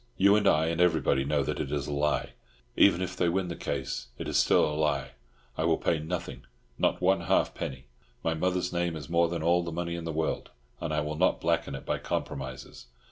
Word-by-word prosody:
You 100 +2 +6
and 105 -1 +3
I 75 -2 +4
and 85 +1 0
everybody 80 -6 +3
know 70 0 +1
that - - -3
it 70 - -3
is 75 -2 -1
a 75 - -4
lie; 75 +1 0 0.4
even 95 -2 +5
if 90 0 -4
they 90 -1 +2
win 90 +1 -1
the 85 - -4
case, - - -4
it - - -5
is - - -3
still - - +5
a 75 - -2
lie. 75 -3 0 0.5
I - - +2
will - - +3
pay 80 - 0
nothing—not 75 -7 -4
one 95 0 +3
halfpenny. 65 -4 -1 0.4
My 80 - +1
mother's 90 +2 -1
name 85 -1 0
is 75 -2 -8
more 85 0 +3
than 85 -2 -3
all 85 +1 +3
the 85 -1 -5
money 85 +1 -3
in 85 -1 -5
the 80 - -2
world, 80 0 -2 0.3
and 80 - -3
I 75 -1 +1
will 75 +1 -3
not 90 +3 +2
blacken 85 0 0
it - - -8
by - - -1
compromises. 65 -2 -5
80 Hz, 220 wpm, -29 LUFS, 75-90 Hz, 0.5 s, You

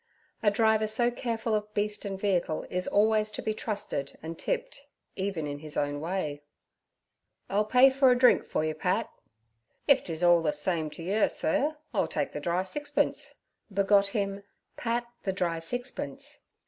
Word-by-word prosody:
A 210 - +5
driver 220 +1 +3
so 240 +3 +2
careful 230 -2 -2
of 210 0 -1
beast 210 0 -1
and 195 -1 -4
vehicle 180 -6 0
is 180 0 -1
always 215 +1 +3
to 210 - -5
be 215 - 0
trusted 205 -10 -4
and 165 +1 -5
tipped, - - -3 0.3
even 190 -5 -2
in 145 0 -4
his 150 0 -5
own 145 0 0
way. 160 -4 -2 1.1
'I'll 210 +2 +2
pay 250 +4 +6
for 265 0 +4
a 250 - +5
drink 250 0 +5
for 155 - -1
you, 155 - -1
Pat.' - - -1 0.8
'If 280 -2 +5
'tis 165 0 -5
orl 175 -1 +6
the 155 -2 +1
same 155 +1 -1
t'yer, 185 +8 0
sur, 295 - 0 0.2
I'll 205 - +1
take 145 -2 -2
the - - -5
dry 175 +4 0
sixpence' 290 +8 -2 0.4
begot 200 0 +4
him 200 -1 -2 0.3
'Pat 240 0 -1 0.2
the 190 - -1
Dry 170 -3 -1
Sixpence.' 245 +10 -5
200 Hz, 165 wpm, -29 LUFS, 165-230 Hz, 1.1 s, pay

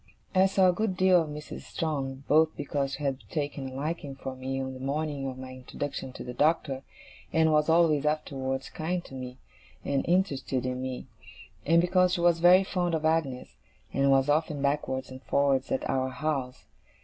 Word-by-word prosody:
I 190 0 +5
saw 190 -1 +4
a 180 - +4
good 200 -1 -1
deal 185 -2 +5
of 160 - -4
Mrs. 150 0 -7
Strong, 140 -4 -3
both 155 +1 +4
because 140 -1 -2
she 150 - -5
had 135 -2 -1
taken 145 -3 -3
a - - -11
liking 145 -1 -4
for 135 -1 -6
me 130 +1 -3
on 130 0 -3
the 130 - -9
morning 140 0 -2
of 130 -1 -5
my 130 0 -8
introduction 130 +1 -5
to - - -7
the 125 - -6
Doctor, 145 -1 +1 0.5
and 160 -1 +3
was 150 0 +3
always 160 -3 +4
afterwards 135 -3 -2
kind 175 +2 -3
to - - -13
me, 130 -1 -7 0.5
and 140 -1 0
interested 145 -8 +1
in 125 0 -2
me; 130 -1 -4 0.6
and 165 +2 +5
because 180 0 +3
she 175 - -2
was 170 -1 +4
very 180 +3 +7
fond 180 -3 -1
of 155 0 -2
Agnes, 155 -6 -1 0.4
and 140 0 +2
was 135 0 +4
often 150 0 +1
backwards 135 -2 -1
and 130 0 -9
forwards 135 -1 +1
at - - -1
our 130 0 0
house. 130 -1 -3
145 Hz, 190 wpm, -28 LUFS, 135-165 Hz, 0.6 s, very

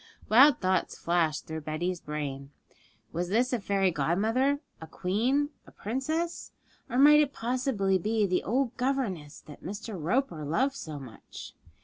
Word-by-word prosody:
Wild 255 +4 +7
thoughts 185 -1 0
flashed 165 -3 0
through 160 0 -5
Betty's 165 +4 -3
brain. 140 -2 -5 0.6
Was 175 +1 -2
this 245 +6 +1
a 245 - +1
fairy 195 -2 +1
godmother, 220 - +1 0.2
a 160 - -8
queen, 245 - 0 0.2
a - - -14
princess? 310 +10 -3 0.4
Or 245 - -2
might 295 +2 +8
it 290 -2 +2
possibly 230 -6 0
be 215 +3 +1
the 185 -2 +1
old 245 +2 0
governess 230 - -2
that 150 - -13
Mr. 205 +3 -6
Roper 175 - 0
loved 255 - +1
so 155 - -7
much? 130 -5 -10
200 Hz, 145 wpm, -28 LUFS, 165-260 Hz, 0.6 s, might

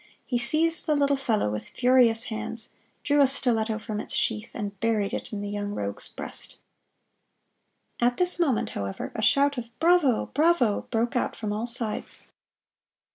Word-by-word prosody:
He 245 -2 -1
seized 315 +7 +2
the 305 - +3
little 280 -1 +2
fellow 220 - 0
with 105 0 -5
furious 245 -3 +3
hands, 225 +1 -6 0.3
drew 290 0 +3
a 275 - +6
stiletto 225 -4 +1
from 215 -1 -5
its 265 - -4
sheath, 225 -3 -1
and 200 -3 -5
buried 220 -3 0
it - - -5
in 205 -2 -4
the 205 - -4
young 205 0 -4
rogue's 100 0 -4
breast. - - -7 1.4
At 245 0 +2
this 360 -1 +4
moment, 275 -10 +1
however, 100 -1 -5
a 220 - -4
shout 280 +4 +3
of 240 - -6
"Bravo! 325 -7 +3
Bravo!" 295 -8 +2
broke 235 +2 -1
out 245 - -1
from 210 -2 -4
all 220 +3 -3
sides. 230 -2 0
235 Hz, 165 wpm, -26 LUFS, 215-275 Hz, 1.4 s, a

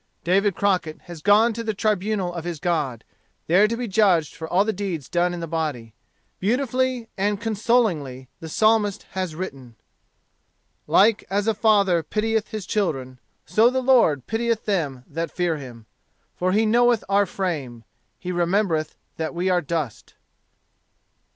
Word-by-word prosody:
David 195 +2 +2
Crockett 180 -6 0
has 175 -3 -10
gone 210 +5 +4
to 230 +1 -5
the 220 -2 -2
tribunal 205 -3 -1
of 170 -2 -5
his 170 -3 -5
God, 150 -9 -1 0.4
there 190 +6 +4
to 230 +1 -3
be 245 0 -3
judged 185 -7 +2
for 160 - -7
all 190 +3 +3
the 220 - 0
deeds 180 -8 -4
done 175 +1 +1
in 175 -1 -5
the - - -3
body. 150 -9 -3 0.5
Beautifully 255 +2 0
and 205 +1 0
consolingly 210 - 0
the 160 - -8
Psalmist 215 +1 +2
has 185 -4 -3
written: 135 -9 -7 1.1
"Like 215 +1 +4
as 205 +2 0
a 225 - +3
father 200 -5 +3
pitieth 220 +5 -1
his 215 -4 -6
children, 135 - -2 0.3
so 225 +2 +4
the 260 +1 -1
Lord 230 - +4
pitieth 230 0 -1
them 150 -11 -1
that 165 +2 -4
fear 175 -2 -1
him. 120 -5 -10 0.5
For 185 +1 0
he 215 +3 +3
knoweth 240 +1 +3
our 200 0 +2
frame; 145 -12 -4 0.3
he 180 - -5
remembereth 175 -2 0 0.2
that 160 +1 -3
we 180 +2 0
are 180 -1 +2
dust." 150 -6 -4
185 Hz, 155 wpm, -23 LUFS, 160-215 Hz, 1.1 s, gone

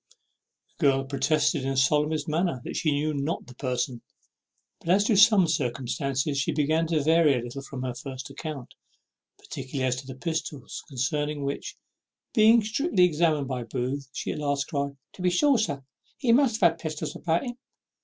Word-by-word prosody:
The - - -4
girl 135 -1 +3
protested 145 +2 +1
in 135 - -2
the 135 - -2
solemnest 150 +3 +2
manner 160 -2 0
that - - -6
she 155 - +1
knew 150 +2 0
not 145 +3 -2
the 125 - -13
person; 125 -2 -2 0.8
but - - -8
as 195 +3 +5
to 220 0 +2
some 200 -2 +6
circumstances 135 -1 -1
she 135 - 0
began 155 +2 +1
to 155 -3 +1
vary 160 -3 +4
a - - -6
little 120 +3 -6
from 135 -1 -7
her 125 -1 -2
first 130 +2 -7
account, 140 -3 -7 0.6
particularly 130 0 -5
as 125 0 0
to 130 0 -8
the 130 - -7
pistols, 155 -2 -4
concerning 145 +2 -2
which, 140 0 -4 0.6
being 225 +1 +6
strictly 220 - +1
examined 155 -4 +2
by 130 -2 -3
Booth, 130 +3 -3
she - - -4
at - - -5
last 140 -1 -1
cried 140 -1 -2 0.2
"To - - -11
be 180 - +3
sure, 260 +8 +3
sir, 140 -10 -2 0.3
he 255 -5 +1
must 235 -3 +4
have 170 -3 +6
had 165 - -13
pistols 155 -2 -4
about 165 0 0
him." 245 -1 -5
145 Hz, 185 wpm, -26 LUFS, 135-165 Hz, 0.8 s, some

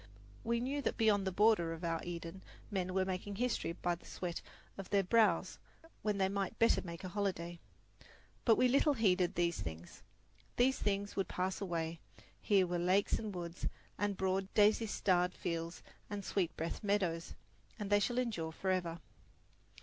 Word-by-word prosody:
We 235 +1 +1
knew 275 +4 -1
that - - -1
beyond 205 -4 +3
the - - +1
border 195 -4 +4
of 165 +1 -8
our 165 -1 -1
Eden 170 +1 -6 0.3
men 185 -2 -1
were 190 -1 +3
making 190 +2 -3
history 240 -6 -1
by 175 +1 -1
the 170 - -10
sweat 175 -2 -4 0.3
of 195 -2 -7
their 200 -1 +3
brows 190 -3 +3 0.4
when 210 -2 0
they 190 -1 +3
might 200 +2 -2
better 230 - +4
make 170 -1 -8
a - - -3
holiday. 175 -4 -2 0.8
But 225 - +6
we 255 - +4
little 280 +3 +4
heeded 185 -6 +2
these 170 - +1
things. 80 -1 -7 0.5
These 255 +2 +3
things 200 0 -1
would 195 - 0
pass 185 +2 -2
away; 165 -3 -2 0.4
here 195 -3 +4
were 175 0 -1
lakes 185 +3 +2
and 215 -2 -4
woods 170 0 -4 0.3
and 205 -1 0
broad 190 0 0
daisy 215 +2 +5
starred 180 -3 +2
fields 170 0 -4 0.3
and 205 -2 -4
sweet 185 -5 -1
breathed 165 +6 -3
meadows, 185 -5 0 0.4
and 205 -2 -5
they 205 - +6
shall 240 +4 0
endure 215 -11 -1
forever. 175 -1 -1
190 Hz, 170 wpm, -35 LUFS, 175-205 Hz, 0.8 s, But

